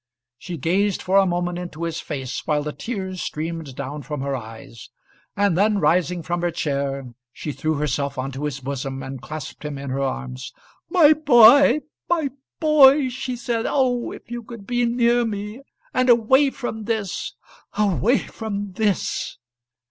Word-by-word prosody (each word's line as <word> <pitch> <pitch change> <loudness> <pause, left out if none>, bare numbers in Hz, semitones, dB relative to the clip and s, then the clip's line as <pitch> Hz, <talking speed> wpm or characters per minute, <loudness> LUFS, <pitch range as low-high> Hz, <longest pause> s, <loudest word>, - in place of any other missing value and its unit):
She 175 -2 -6
gazed 190 +6 +1
for 190 +2 +1
a 195 - +3
moment 175 0 -1
into 175 -2 -6
his 165 -1 -2
face 135 -3 -5
while 150 -2 +1
the 150 0 -4
tears 190 -6 -5
streamed 160 -3 -4
down 140 +2 -5
from 150 -2 -5
her 140 0 -1
eyes, 115 -2 -10 0.5
and 200 -3 +3
then 205 +3 +3
rising 180 -2 +1
from 175 +2 -2
her 175 - +1
chair, 140 -5 -3 0.2
she 150 - -5
threw 155 +3 -1
herself 140 -1 -1
on 130 +1 -3
to 135 +3 -4
his 135 -2 -4
bosom 135 0 -4
and 130 -1 -7
clasped 155 -1 -7
him 150 -2 -4
in 135 -1 -5
her 135 +1 -1
arms. 130 -1 -4 0.4
"My 315 -5 +6
boy! 280 -1 +7 0.3
my 320 -6 +1 0.3
boy!" 290 -3 +6
she 255 0 -4
said. 235 -1 -2
"Oh, 250 -3 +1
if - - -11
you 240 0 -4
could 230 -2 -11
be 245 +1 +1
near 240 0 +3
me, 210 +2 -4 0.3
and 255 0 +2
away 255 +4 +5
from 225 -5 -5
this 220 -4 -2 0.4
away 210 +4 +3
from 205 -3 -5
this!" 205 0 -1
180 Hz, 165 wpm, -22 LUFS, 140-235 Hz, 0.5 s, boy